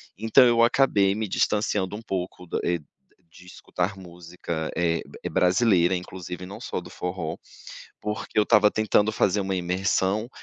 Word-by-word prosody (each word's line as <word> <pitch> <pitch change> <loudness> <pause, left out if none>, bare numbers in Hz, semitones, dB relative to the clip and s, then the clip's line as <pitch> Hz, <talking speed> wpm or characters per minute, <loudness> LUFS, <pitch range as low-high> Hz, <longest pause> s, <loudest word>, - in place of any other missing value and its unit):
Então, 110 +7 +5
eu 120 -1 +4
acabei 105 -6 +3
me 110 0 -2
distanciando 105 -1 0
um 110 - -7
pouco, 90 -3 -5
da - - -2
eh 85 0 0 0.6
de 90 - -15
escutar 90 +1 -4
música, 85 -2 -6
eh 85 -1 0 0.2
eh, - - -3
brasileira, 90 -1 +3
inclusive, 90 0 -7
não 95 +2 -9
só - - -4
do 90 - -12
forró, 90 -3 -4 0.7
porque 105 +1 -5
eu 105 - +6
estava 105 -1 +5
tentando 110 0 +2
fazer 105 -1 +1
uma 95 0 -2
imersão, 95 +4 0
95 Hz, 155 wpm, -25 LUFS, 90-105 Hz, 0.7 s, eu